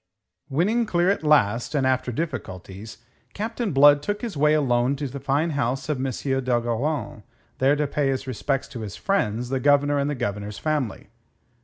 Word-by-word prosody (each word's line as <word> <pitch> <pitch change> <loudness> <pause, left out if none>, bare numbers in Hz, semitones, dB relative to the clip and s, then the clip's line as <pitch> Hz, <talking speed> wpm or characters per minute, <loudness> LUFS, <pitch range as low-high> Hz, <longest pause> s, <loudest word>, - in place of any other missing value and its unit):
Winning 210 - +1
clear 175 0 +2
at 200 - -1
last, 145 -2 +2
and 135 -2 +2
after 130 -1 +1
difficulties, 110 - -6 0.3
Captain 225 +1 -3
Blood 145 0 +6
took 205 - -3
his 225 -7 -4
way 150 +1 +3
alone 125 -2 +2
to 140 0 -4
the 135 +2 -7
fine 145 +5 0
house 135 -1 -2
of 150 - 0
M. 130 - -1 0.4
d'Ogeron, 120 +1 -1 0.4
there 135 +2 +4
to 150 0 0
pay 145 0 -1
his 135 0 -1
respects 135 +2 -2
to 125 - -7
his 105 -3 -6
friends, 125 - -1
the 135 0 0
Governor 145 +1 +3
and 140 +1 0
the 145 - -2
Governor's 105 -4 -4
family. 150 -8 -2
140 Hz, 175 wpm, -24 LUFS, 120-150 Hz, 0.4 s, Blood